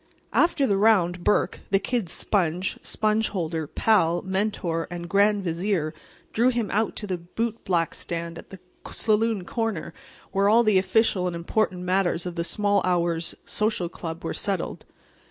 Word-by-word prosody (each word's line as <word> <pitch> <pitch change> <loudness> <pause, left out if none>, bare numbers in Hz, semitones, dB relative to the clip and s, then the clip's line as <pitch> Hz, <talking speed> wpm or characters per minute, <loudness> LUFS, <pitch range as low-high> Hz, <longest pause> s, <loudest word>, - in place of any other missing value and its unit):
After 335 -5 +3
the 200 -5 +2
round 185 -5 +3
Burke, 205 - +1
the 195 - +4
"Kid's" 200 -2 -2
sponge, 180 -2 0
sponge 215 0 +1
holder, 165 -5 -3
pal, 175 -3 +2
Mentor 190 -4 -1
and 175 0 -6
Grand 200 +1 +3
Vizier, 170 -2 -1 0.4
drew 235 +3 +4
him 235 -4 -1
out 215 +2 0
to 210 - -4
the 185 -3 -3
bootblack 185 -2 -2
stand 170 0 -5
at - - -13
the 195 - -10 0.3
saloon 220 -3 +1
corner 225 -7 -3 0.4
where 200 +1 +3
all 230 +3 +6
the 215 -4 +4
official 190 -2 +2
and 175 - -3
important 180 +2 -1
matters 180 -2 +1
of 180 - -4
the 170 -1 -2
Small 205 +2 +1
Hours 170 -2 0
Social 210 -5 -1
Club 165 0 -7
were - - -2
settled. 195 -4 -3
190 Hz, 155 wpm, -25 LUFS, 170-215 Hz, 0.4 s, all